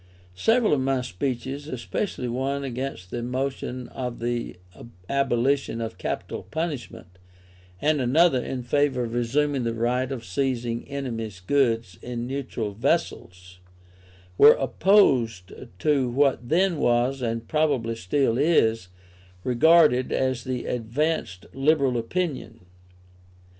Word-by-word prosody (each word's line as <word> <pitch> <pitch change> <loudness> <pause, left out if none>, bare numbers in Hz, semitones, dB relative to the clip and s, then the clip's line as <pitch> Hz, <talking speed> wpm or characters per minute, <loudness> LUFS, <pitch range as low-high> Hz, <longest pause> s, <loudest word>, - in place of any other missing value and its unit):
Several 225 - +2
of 145 - +2
my 130 -1 0
speeches, 130 +5 -4
especially 130 - -3
one 135 +3 -2
against 130 -8 -5
the 120 - -3
motion 130 0 -3
for 125 -1 -3
the 120 -2 -4 0.5
abolition 135 -2 0
of 115 -1 -5
capital - - -4
punishment, 120 - -6 0.6
and 150 +2 +1
another 130 +1 +3
in 130 -2 -4
favour 135 0 +1
of 115 -1 -5
resuming 135 +3 0
the 115 -1 -2
right 125 +3 0
of 120 -4 -5
seizing 120 +2 -2
enemies' 115 -8 -5
goods 115 -3 0
in 120 -1 -5
neutral 125 -5 -4
vessels, 90 -3 -2 0.8
were 145 +1 +10
opposed 130 - +2 0.2
to 140 +1 +1
what 130 -1 +1
then 175 +2 +2
was, 125 +2 +1
and 115 -1 -3
probably 145 -7 +1
still 115 +4 0
is, 115 - +2 0.6
regarded 130 0 +4
as 130 -2 0
the 130 -2 -3
advanced 120 - -2
liberal 135 -2 +2
opinion. 140 - -3
125 Hz, 115 wpm, -25 LUFS, 115-140 Hz, 0.8 s, were